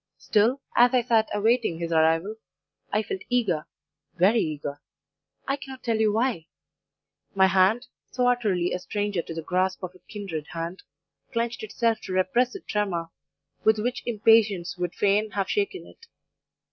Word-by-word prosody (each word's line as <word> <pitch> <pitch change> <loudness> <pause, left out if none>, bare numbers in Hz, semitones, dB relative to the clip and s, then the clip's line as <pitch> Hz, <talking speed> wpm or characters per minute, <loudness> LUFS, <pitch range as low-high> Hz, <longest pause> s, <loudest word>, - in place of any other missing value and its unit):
Still, 230 +6 +2
as 245 +1 +5
I 245 - +3
sat 225 -2 +2
awaiting 220 -4 +1
his 170 0 -4
arrival, 165 +6 +2 0.5
I 215 +1 +1
felt 190 -2 -5
eager 190 -11 0 0.5
very 195 +6 +4
eager 145 -4 -3 0.7
I 275 - 0
cannot 265 -1 -10
tell 230 -2 +1
you 215 -1 +3
why; 220 -7 0 0.9
my 190 -1 +6
hand, 190 +5 +3 0.2
so 250 -1 0
utterly 205 -8 +1
a 180 - -2
stranger 205 0 -2
to 165 - -8
the 165 - -4
grasp 185 +2 0
of 180 0 -5
a 185 - -18
kindred 185 -8 -5
hand, 170 +2 -5 0.5
clenched 235 0 -2
itself 225 +1 0
to 185 - -5
repress 185 +7 +2
the 395 - -7
tremor 180 - -2 0.5
with 220 0 +4
which 245 +4 -2
impatience 215 -5 +3
would 180 -1 -3
fain 205 +2 +2
have 195 -1 -1
shaken 405 -2 -1
it. 460 - -17
205 Hz, 160 wpm, -26 LUFS, 180-235 Hz, 0.9 s, my